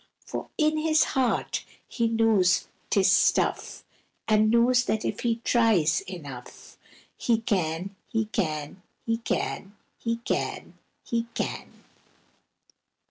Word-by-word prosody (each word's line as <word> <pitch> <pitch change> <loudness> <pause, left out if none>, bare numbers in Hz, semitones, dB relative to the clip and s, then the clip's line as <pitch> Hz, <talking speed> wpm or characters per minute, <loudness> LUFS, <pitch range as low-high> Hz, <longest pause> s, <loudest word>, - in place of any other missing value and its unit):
For - - -6
in 310 0 +2
his 310 0 +3
heart 260 -2 0 0.2
he 230 -2 0
knows 220 -6 +3 0.2
'tis 195 -1 +4
stuff, 200 - +2 0.4
And 215 0 +4
knows 245 +2 +4
that 215 -1 -1
if - - -2
he 230 -1 -1
tries 195 -8 +3
enough, 140 -9 -10 0.4
He 230 -2 +1
can! 185 -3 -1
he 225 -2 -1
can! 160 -5 -3 0.2
he 230 0 0
can! 205 -3 -3 0.2
he 230 0 -1
can! - - -2 0.3
he 235 -1 -2
can! - - -5
220 Hz, 115 wpm, -26 LUFS, 185-235 Hz, 0.4 s, tis